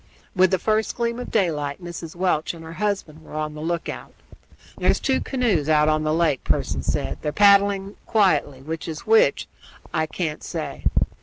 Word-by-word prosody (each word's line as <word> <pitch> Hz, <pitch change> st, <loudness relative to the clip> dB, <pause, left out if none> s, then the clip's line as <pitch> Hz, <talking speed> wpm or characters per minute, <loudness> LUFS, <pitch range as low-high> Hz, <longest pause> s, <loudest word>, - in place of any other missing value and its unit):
With 185 Hz, 0 st, +5 dB
the 190 Hz, -, +2 dB
first 215 Hz, +4 st, 0 dB
gleam 235 Hz, 0 st, -1 dB
of 250 Hz, -, -6 dB
daylight 150 Hz, -9 st, 0 dB
Mrs. 175 Hz, -2 st, -8 dB
Welch 175 Hz, -3 st, 0 dB
and 165 Hz, -, -11 dB
her 160 Hz, -, -8 dB
husband 190 Hz, -6 st, -2 dB
were -, -, -11 dB
on 155 Hz, 0 st, -2 dB
the 150 Hz, -, -8 dB
lookout. 170 Hz, +1 st, -4 dB, 0.6 s
"There's -, -, +2 dB
two 265 Hz, -2 st, +1 dB
canoes 215 Hz, -, 0 dB
out 150 Hz, -1 st, +4 dB
on 155 Hz, 0 st, +2 dB
the 155 Hz, -, 0 dB
lake," 160 Hz, -4 st, +1 dB
Pearson -, -, 0 dB
said. -, -, -2 dB
"They're 150 Hz, -, -2 dB
paddling 200 Hz, +1 st, +4 dB
quietly; 150 Hz, -, +2 dB
which 160 Hz, +3 st, -5 dB
is 160 Hz, -2 st, -6 dB
which 450 Hz, +2 st, +4 dB, 0.5 s
I 160 Hz, 0 st, +1 dB
can't 155 Hz, -2 st, -3 dB
say." -, -, -5 dB
170 Hz, 175 wpm, -23 LUFS, 155-200 Hz, 0.6 s, With